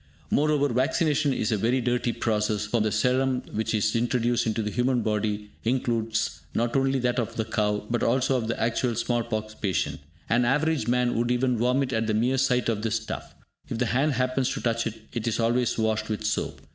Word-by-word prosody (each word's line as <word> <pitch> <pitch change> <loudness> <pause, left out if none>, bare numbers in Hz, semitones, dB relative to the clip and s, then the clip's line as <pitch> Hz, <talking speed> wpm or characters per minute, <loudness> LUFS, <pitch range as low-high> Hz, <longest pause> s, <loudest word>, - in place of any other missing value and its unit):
Moreover, 145 -1 +2
vaccination 145 +4 +1
is 115 -4 -1
a 110 - +2
very 120 +6 +1
dirty 120 0 0
process, 105 -2 0
for 110 +2 0
the 110 0 +1
serum 130 +1 +1
which 110 +1 -1
is 105 +1 +1
introduced 120 0 +1
into 110 0 0
the 105 - -2
human 125 +1 +1
body 105 -1 -1
includes 115 -2 -1
not 120 +1 0
only 135 0 +2
that 125 -1 0
of 115 -1 -3
the 110 - -1
cow, 105 -1 0
but 120 0 -1
also 130 +2 +2
of 120 -3 -1
the 115 - -2
actual 115 +1 0
small 120 +1 0
pox 110 -2 -4
patient. 80 -8 -1 0.3
An 120 +2 +3
average 145 0 +1
man 125 0 +2
would 120 0 0
even 125 +1 +2
vomit 125 +3 +1
at 110 -1 0
the 110 - +1
mere 125 +4 +2
sight 125 -1 +2
of 110 -3 0
this 110 0 0
stuff. 110 -1 -5 0.3
If - - -3
the 125 - +1
hand 140 +4 +2
happens 130 +1 0
to - - -4
touch 115 -1 0
it, 110 0 -6
it 120 -1 -3
is 115 - 0
always 120 +1 +1
washed 110 -1 0
with 110 0 -3
soap. 105 - -2
120 Hz, 210 wpm, -26 LUFS, 110-125 Hz, 0.3 s, An